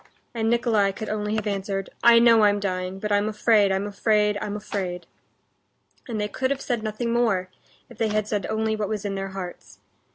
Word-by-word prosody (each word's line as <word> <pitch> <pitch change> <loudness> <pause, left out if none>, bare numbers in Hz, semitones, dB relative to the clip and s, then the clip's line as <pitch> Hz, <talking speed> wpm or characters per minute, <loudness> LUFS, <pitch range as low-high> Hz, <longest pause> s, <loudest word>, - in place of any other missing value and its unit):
and 225 -1 0
Nikolay 225 -4 +2
could 220 +2 -6
only 210 0 -2
have 215 -1 -2
answered, 195 -1 -3
"I 235 0 +8
know 230 -1 +6
I'm 205 -1 +4
dying, 185 -1 -3
but 210 +2 -4
I'm 205 +1 +2
afraid, 210 -2 +3
I'm 190 +1 0
afraid, 210 0 +1
I'm 210 -1 -3
afraid!" 195 -4 -4 1.0
And 225 -3 -3
they 210 - 0
could 260 +5 -2
have 280 0 -1
said 245 -4 -2
nothing 220 +2 -2
more, 205 -6 +1 0.4
if - - -16
they 225 - +2
had 215 0 -1
said 210 -2 -2
only 220 0 0
what 210 -2 -3
was 210 -2 -3
in 200 - -2
their 195 0 -4
hearts. 190 -2 -8
210 Hz, 200 wpm, -24 LUFS, 200-220 Hz, 1.0 s, I